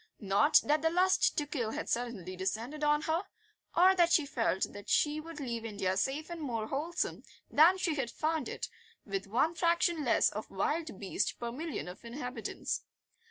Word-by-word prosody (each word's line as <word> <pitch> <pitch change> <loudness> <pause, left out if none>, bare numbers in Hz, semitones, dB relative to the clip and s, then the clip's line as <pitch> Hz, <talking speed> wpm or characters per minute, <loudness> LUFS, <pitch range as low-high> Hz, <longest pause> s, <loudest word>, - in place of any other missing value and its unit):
Not 205 +8 +4
that 300 +1 +2
the 325 - +3
lust 370 +3 +3
to 295 - +1
kill 245 -7 -3
had - - -4
suddenly 230 -7 -3
descended 220 +11 -3
on 295 +1 +3
her, 325 +4 0 0.5
or 370 +2 +7
that 345 -2 +3
she 320 -3 +4
felt 230 -8 0
that 205 0 -9
she 300 0 +2
would 325 0 -8
leave 235 -5 -3
India 200 -4 -1
safer 295 - -1
and 335 - -7
more 230 -7 -2
wholesome 325 +5 -2 0.3
than 335 +5 +6
she 355 -3 0
had 270 -5 -2
found 315 +3 -1
it, - - -4 0.4
with 195 -1 -3
one 255 +11 +2
fraction 340 -1 +2
less 240 - +3
of 215 - -6
wild 300 - -2
beast 195 - -1
per 235 -1 -3
million 305 - -4
of 180 +5 -9
inhabitants. 245 -1 -4
285 Hz, 180 wpm, -32 LUFS, 225-325 Hz, 0.5 s, or